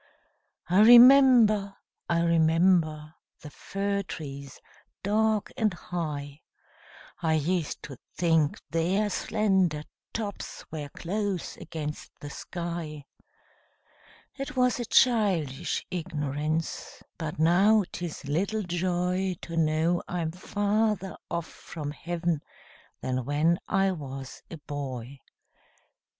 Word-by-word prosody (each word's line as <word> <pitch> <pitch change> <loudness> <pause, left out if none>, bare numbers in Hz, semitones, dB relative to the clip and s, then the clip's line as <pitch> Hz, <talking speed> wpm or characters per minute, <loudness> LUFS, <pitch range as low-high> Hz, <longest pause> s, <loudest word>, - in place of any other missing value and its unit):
I 180 +4 +3
remember, 235 -4 +7 0.3
I 170 0 +2
remember, 165 -2 +2 0.3
The 150 - -10
fir 200 +3 -2
trees 140 -7 -8 0.4
dark 215 +1 +1
and 215 -7 +1
high; 150 -5 -5 0.8
I 160 -2 +2
used 160 +1 -1
to 135 -4 -8 0.2
think 165 -4 +2
their 185 +6 +1
slender 190 -7 +1 0.3
tops 210 -3 -5
Were 150 -2 -5
close 195 +3 -3
against 155 -2 -6
the 145 - -8
sky: 170 -3 -6 1.3
It 275 +1 -6
was 250 0 +3
a 240 - -2
childish 180 - +2
ignorance, 155 -2 -3 0.2
But 155 -3 -4
now 190 +7 +5
'tis 170 -4 -6
little 195 +9 -1
joy 180 +1 -1
To 165 - -6
know 165 +2 +2
I'm 170 -3 -2
farther 205 +1 -1
off 170 -1 -2
from 150 -2 -7
Heav'n 170 0 -2 0.6
Than 130 0 -1
when 155 +6 +2
I 195 0 +2
was 135 -6 -7
a 165 - -7
boy. 135 -3 -6
170 Hz, 105 wpm, -27 LUFS, 155-200 Hz, 1.3 s, remember